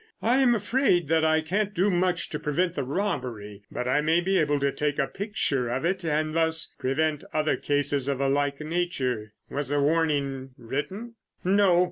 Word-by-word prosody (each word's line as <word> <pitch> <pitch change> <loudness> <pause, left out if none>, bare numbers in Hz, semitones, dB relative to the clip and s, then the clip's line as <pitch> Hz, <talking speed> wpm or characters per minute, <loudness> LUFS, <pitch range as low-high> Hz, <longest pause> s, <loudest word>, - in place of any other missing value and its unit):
I 240 +3 +3
am 255 -3 +4
afraid 210 - +1
that 160 -1 +3
I 160 0 +3
can't 200 +6 -1
do 190 +3 +2
much 180 -1 0
to 150 - -4
prevent 170 +4 0
the 140 - -2
robbery, 125 - -3
but 125 - -3
I 145 +4 +2
may 160 +3 +3
be 190 +2 +1
able 145 -2 +1
to 140 0 +1
take 150 0 -1
a 140 - +2
picture 145 - -2
of 130 +6 -2
it 185 +1 0
and 155 -1 0
thus 160 0 +2
prevent 150 +3 0
other 155 0 +1
cases 145 -2 0
of 140 -2 -1
a 140 - +1
like 140 0 0
nature." 135 -10 -2 0.2
"Was 145 -1 -2
the 145 0 +1
warning 140 -4 0
written?" 170 - -5 0.3
"No. 190 -1 +4
155 Hz, 185 wpm, -26 LUFS, 140-180 Hz, 0.3 s, am